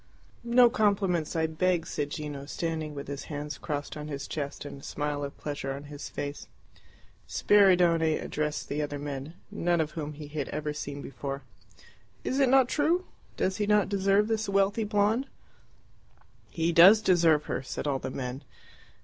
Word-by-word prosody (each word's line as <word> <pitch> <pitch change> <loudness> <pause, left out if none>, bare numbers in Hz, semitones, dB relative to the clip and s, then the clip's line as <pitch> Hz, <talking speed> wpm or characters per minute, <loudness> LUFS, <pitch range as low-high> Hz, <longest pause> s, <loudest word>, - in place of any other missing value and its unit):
"No 240 +1 +6
compliments, 200 -9 +1
I 160 -1 +2
beg," 170 +1 0
said 145 -3 -3
Gino, 145 -2 -6
standing 160 -1 -3
with 140 - -6
his 140 0 -5
hands 150 -1 -5
crossed 145 -1 -4
on 150 0 -6
his 140 -2 -5
chest 145 -1 -5
and 140 -1 -8
a - - -19
smile 145 -1 -3
of 140 0 -6
pleasure 140 -2 -4
on 140 +1 -7
his 145 - -7
face. 145 0 -5 0.8
Spiridione 175 -6 +4
addressed 150 0 -3
the 150 +1 -2
other 145 -1 -3
men, 140 +2 -6 0.2
none 175 0 +1
of 155 -1 0
whom 150 -2 -5
he 150 0 -9
had 145 -1 -4
ever 150 0 -3
seen 145 -1 -6
before. 140 +1 -5 0.8
"Is 265 - -1
it 270 -2 +4
not 265 -1 +5
true? 325 +7 +1 0.3
Does 190 +1 0
not 210 0 +4
he - - -8
deserve 200 +1 +2
this 220 -2 -1
wealthy 200 +2 +2
blonde?" 210 +5 +1 1.2
"He 165 0 0
does 185 +6 +8
deserve 165 -5 +4
her," - - -2
said 130 - -5
all 140 -2 0
the 130 - -4
men. 130 +1 -5
155 Hz, 170 wpm, -28 LUFS, 145-195 Hz, 1.2 s, does